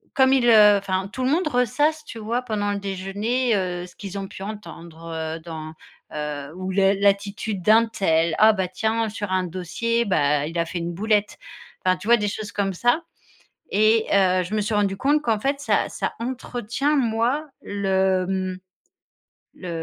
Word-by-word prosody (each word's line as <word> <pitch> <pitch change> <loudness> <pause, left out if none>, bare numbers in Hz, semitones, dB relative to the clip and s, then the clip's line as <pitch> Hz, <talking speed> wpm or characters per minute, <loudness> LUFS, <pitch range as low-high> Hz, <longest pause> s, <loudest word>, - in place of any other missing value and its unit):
comme 265 0 +5
ils, 255 -3 +3
heu, 210 -2 +7
enfin, 190 -1 -2
tout 260 - -3
le 255 - +2
monde 335 +1 +1
ressasse, 295 +4 +1
tu - - -9
vois, 230 +3 -2
pendant 210 -3 -2
le 200 - -2
déjeuner, 205 +5 -1
heu, 180 -2 -2
ce 175 - -18
qu'ils 200 0 -7
ont 195 - -5
pu 190 - -11
entendre, 170 -6 -9 0.3
heu, - - -11
dans, 160 -1 -7 0.4
heu, 150 -1 -4
ou 185 +1 -4
le 195 +1 +3
l'attitude 200 0 0
d'un 220 +4 +5
tel: 165 -6 +1
«Ah, 220 +1 +7
bah, 190 -3 -1
tiens 220 +4 -1
sur 205 -2 -5
un 185 0 +1
dossier, 185 +7 -2
bah, 150 -5 +1
il 165 +2 -6
a 170 - +1
fait 170 +1 -5
une 170 +1 -3
boulette». 210 +2 0 0.5
Enfin, 185 0 +3
tu 185 - -10
vois, 235 +1 +6
des 210 -2 -1
choses 205 0 -6
comme 195 -1 -1
ça 245 - +1 0.7
et 215 +2 +3
heu, 185 -2 +3
je 190 +5 -5
me 215 - +1
suis 210 - -3
rendue 200 -2 +1
compte 290 +8 +2
qu'en 225 -5 +1
fait 275 +4 -1
ça - - +1
ça - - -3
entretient 250 +3 -2
moi 245 +4 +1 0.2
le, 190 -2 +1
hem, 185 -1 -2 1.0
le 180 - -9
205 Hz, 190 wpm, -23 LUFS, 185-230 Hz, 1.0 s, heu